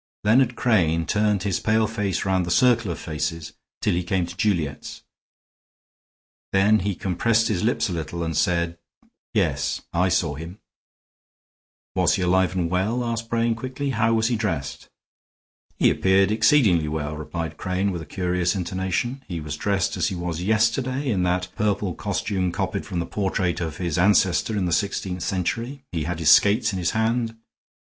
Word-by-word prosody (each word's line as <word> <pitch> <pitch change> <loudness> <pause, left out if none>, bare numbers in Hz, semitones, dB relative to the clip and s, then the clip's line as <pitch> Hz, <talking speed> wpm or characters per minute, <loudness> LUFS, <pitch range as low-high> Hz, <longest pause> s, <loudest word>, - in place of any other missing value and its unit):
Leonard 120 +3 +3
Crane 85 -9 +2
turned 105 +2 +1
his 100 -4 0
pale 110 +1 +2
face 105 -5 -2
round 95 -1 +1
the 85 - -4
circle 115 +1 +3
of 85 - -3
faces 80 0 -4 0.3
till - - +2
he 90 - 0
came 90 0 0
to 85 +1 -9
Juliet's; 85 -8 -2 1.5
then 105 +3 +4
he 100 +1 -2
compressed 110 +6 +1
his 105 -3 -1
lips 120 +3 +1
a 95 - -4
little 85 +1 -4
and 80 -1 -3
said: 85 +1 0 0.6
"Yes, - - 0
I 90 +2 +2
saw 85 -4 +1
him." 80 +6 -8 1.4
"Was - - +2
he 95 - -1
alive 95 +1 +2
and 90 -2 0
well?" 100 +8 0
asked 115 -1 -3
Brain, 115 0 +1
quickly. 130 +4 -4
"How 115 -1 +2
was 110 +1 +2
he 120 - +1
dressed?" 105 -2 -3 0.9
"He - - +4
appeared 95 +1 +3
exceedingly 105 - +4
well," 75 0 -3
replied 80 +1 -5
Crane, 95 +2 -1
with 85 -3 -4
a 80 - -10
curious 90 0 -1
intonation. 95 +8 -2
"He 85 -3 -4
was 75 -2 -5
dressed 100 +3 -1
as - - +1
he 95 - -3
was 85 -1 -4
yesterday, 115 +7 +1
in 95 -4 0
that 90 +1 -1
purple 100 -3 0
costume 90 +2 -2
copied 85 - -3
from 90 - -4
the 85 - -1
portrait 95 -3 -1
of 80 -3 -4
his 85 -2 -2
ancestor 95 +2 +3
in 95 - 0
the 90 - -1
sixteenth 95 -1 -1
century. 115 +10 -2
He 80 -4 -2
had 90 0 -3
his 80 -2 +4
skates 105 +1 +4
in 95 - -2
his 85 - 0
hand." 115 0 0
95 Hz, 170 wpm, -23 LUFS, 85-110 Hz, 1.5 s, then